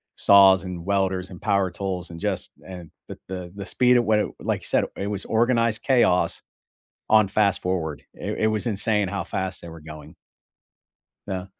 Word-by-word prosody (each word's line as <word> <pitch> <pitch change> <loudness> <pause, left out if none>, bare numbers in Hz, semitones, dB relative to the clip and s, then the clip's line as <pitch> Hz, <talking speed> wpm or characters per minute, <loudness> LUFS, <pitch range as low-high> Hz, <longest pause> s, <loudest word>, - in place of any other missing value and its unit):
saws 95 -2 +6
and 90 -2 -7
welders, 95 -2 0
and 90 - -11
power 100 -3 +1
tools, 90 -1 -4
and 85 - -9
just 100 -2 -3
and 90 -4 -10 0.2
the - - -8
the 90 -2 -6
the 100 -1 -7
speed 125 +3 +3
at 120 - +3
what 110 -1 +3
it - - 0
like - - -2
you - - -10
said, - - +2
it 100 - -3
was 100 -1 -4
organized 115 -1 +1
chaos 120 -9 +2 0.7
on 110 -2 +5
fast 100 -2 +1
forward. 85 -5 -3
It - - -5
it - - +4
was 110 +1 -1
insane 105 -1 0
how 100 +1 -3
fast 95 -1 -4
they - - -10
were 80 -1 -11
going. 75 +1 -11 1.1
Yeah. 95 -1 -4
95 Hz, 185 wpm, -24 LUFS, 90-105 Hz, 1.1 s, saws